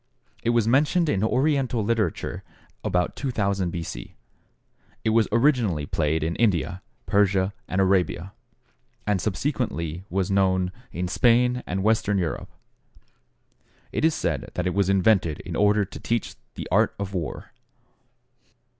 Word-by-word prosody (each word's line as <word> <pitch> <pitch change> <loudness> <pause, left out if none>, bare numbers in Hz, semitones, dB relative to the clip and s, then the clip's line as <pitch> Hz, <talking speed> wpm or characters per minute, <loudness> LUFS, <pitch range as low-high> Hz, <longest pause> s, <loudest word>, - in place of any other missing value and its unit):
It - - 0
was 120 -2 +2
mentioned 150 +7 +3
in 100 -4 +1
Oriental 130 -1 +1
literature 115 -1 -1 0.4
about 90 -1 0
2000 100 - -1
B. 85 -1 -4
C. - - -8 0.9
It 110 - +2
was 115 0 +3
originally 115 - +2
played 80 +1 0
in 80 +1 -1
India, 95 -4 +1 0.2
Persia, 100 -1 +2
and 95 - -1
Arabia, 95 -1 +1 0.7
and 100 -3 +1
subsequently 90 - -2
was 95 +1 -1
known 95 -2 +2 0.2
in 90 +2 -3
Spain 125 +5 +3
and 95 +1 -2
Western 105 -1 +2
Europe. 85 -5 -2 1.4
It - - -2
is 160 -1 +3
said - - -2
that 90 - -1
it 90 - 0
was 100 -1 +1
invented 95 -5 +3
in - - -6
order 105 0 +3
to - - -10
teach 115 -1 -2 0.2
the - - -6
art - - +3
of 100 -1 -5
war. 85 -4 -4
100 Hz, 135 wpm, -25 LUFS, 90-115 Hz, 1.4 s, mentioned